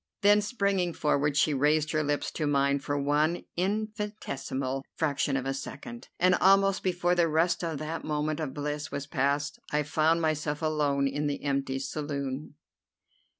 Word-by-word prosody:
Then, 205 +1 +6
springing 200 -5 0
forward, 145 -1 +1
she 155 - +3
raised 150 +2 +2
her 155 - +1
lips 145 0 -1
to 155 - -2
mine 140 0 +2
for 145 +1 -2
one 150 +4 +1
infinitesimal 195 -10 -3
fraction 140 -3 0
of 130 - -3
a 135 - 0
second, 240 - -8
and 185 +1 +5
almost 195 +1 +4
before 180 -1 +1
the 175 -2 +3
rest 165 +3 +1
of 165 -3 -2
that 155 +3 -4
moment 150 0 -1
of 150 -4 -2
bliss 150 +1 -4
was 140 - -4
passed 140 +1 -1
I 150 0 +1
found 160 +2 +2
myself 155 -1 -1
alone 145 -3 +1
in 145 +2 -1
the 145 - -3
empty 135 -2 -1
saloon. 140 0 -4
150 Hz, 160 wpm, -28 LUFS, 140-175 Hz, -, Then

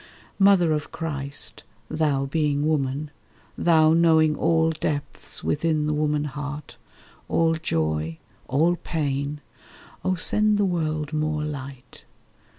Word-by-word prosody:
Mother 195 -4 +5
of 150 -1 -2
Christ, 145 -3 -2 0.2
thou 145 -2 0
being 145 0 0
woman, 145 -1 -1 0.4
thou 160 -2 +4
Knowing 160 -2 +4
all 160 0 +2
depths 150 -2 -4
within 155 0 0
the 150 - 0
woman 150 0 0
heart, 150 0 -6 0.5
All 165 0 +2
joy, 80 - -1 0.3
all 165 +7 +2
pain, 145 -3 -3 0.6
oh 185 0 +1
send 210 +4 +3
the 205 - +2
world 155 -4 -2
more 155 0 -1
light. 135 -4 -8
150 Hz, 115 wpm, -24 LUFS, 145-160 Hz, 0.6 s, Mother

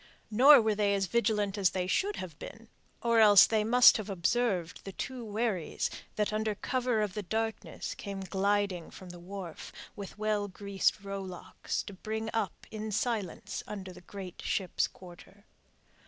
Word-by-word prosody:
Nor 260 +3 +8
were 220 -1 +2
they 205 -1 +2
as 195 -1 +1
vigilant 210 -1 0
as 190 -3 +4
they 185 -1 -2
should 395 - 0
have 170 -5 -7
been, 230 0 -10 0.3
or 235 -1 +3
else 205 -3 +9
they 220 -1 +1
must 245 +3 +7
have 215 -1 -6
observed 190 -1 0
the 195 - -7
two 255 +2 -5
wherries 210 -5 -2 0.2
that 210 0 0
under 215 0 0
cover 250 0 0
of 205 -3 -3
the 210 - -3
darkness 220 +3 -3
came 200 -1 -6
gliding 195 -2 0
from 185 - -11
the 175 - -11
wharf, 180 -2 -8 0.2
with 200 -1 -8
well 210 -1 0
greased 200 +1 -1
rowlocks, 195 -2 -5
to 200 - -9
bring 220 +3 -4
up 225 - -2
in 215 0 -5
silence 210 -4 -2
under 190 -3 -7
the 180 - -13
great 185 0 -9
ship's 190 -3 0
quarter. 185 +3 -15
205 Hz, 165 wpm, -30 LUFS, 190-220 Hz, 0.3 s, else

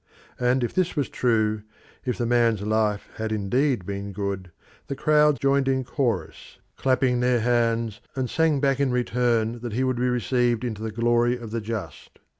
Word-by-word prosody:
And 125 +1 +2
if 120 - -2
this 185 -1 0
was 145 -3 -1
true, 110 -3 +1 0.4
if 125 - -1
the 120 - -1
man's 115 -3 +2
life 105 -1 0
had 110 0 -3
indeed 110 +2 0
been 100 +1 -5
good, 100 -2 -4 0.4
the 140 - -3
crowd 150 0 +3
joined 140 0 +2
in 130 -1 +1
chorus, 130 -2 -3 0.2
clapping 130 -1 +1
their 125 -1 +2
hands, 115 -2 +1
and 130 -1 -1
sang 160 +1 +2
back 135 -1 +1
in 140 -2 +2
return 120 -2 0
that 120 -2 -6
he 125 +4 0
would 130 -1 0
be 125 +1 +1
received 125 -1 +1
into 110 -4 -4
the 110 - -3
glory 120 +2 +2
of 115 -3 -9
the 115 0 -2
just. 105 -9 -6
120 Hz, 180 wpm, -25 LUFS, 110-130 Hz, 0.4 s, crowd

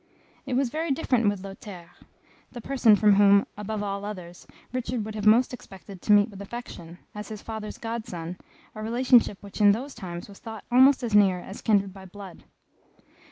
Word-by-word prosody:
It 255 - -1
was 260 -2 +1
very 320 +3 -2
different 255 -6 +1
with 200 -2 -4
Lothaire, 195 -3 -10 0.6
the 245 - -7
person 240 -3 +4
from 210 0 +4
whom, 200 0 +6
above 210 0 -4
all 200 0 -4
others, 180 -4 -8 0.3
Richard 245 -3 -3
would 220 - -6
have 210 -1 -2
most 240 +4 +5
expected 195 -5 -11
to - - 0
meet 205 0 +6
with 200 -1 -10
affection, 195 -6 -9 0.2
as 210 -1 -7
his 215 -1 -8
father's 220 -1 -6
god 230 -1 -5
son, 170 +1 -7 0.3
a 215 - -8
relationship 235 -1 +3
which 200 +1 -7
in 205 -1 +7
those 265 +6 -5
times 175 -6 -7
was 200 -1 -14
thought 220 -2 -9
almost 260 +2 +5
as 230 -3 -3
near 195 -3 +5
as 195 +3 -10
kindred 200 -3 +1
by 190 -1 -12
blood. 190 -1 -11
210 Hz, 190 wpm, -26 LUFS, 195-235 Hz, 0.6 s, in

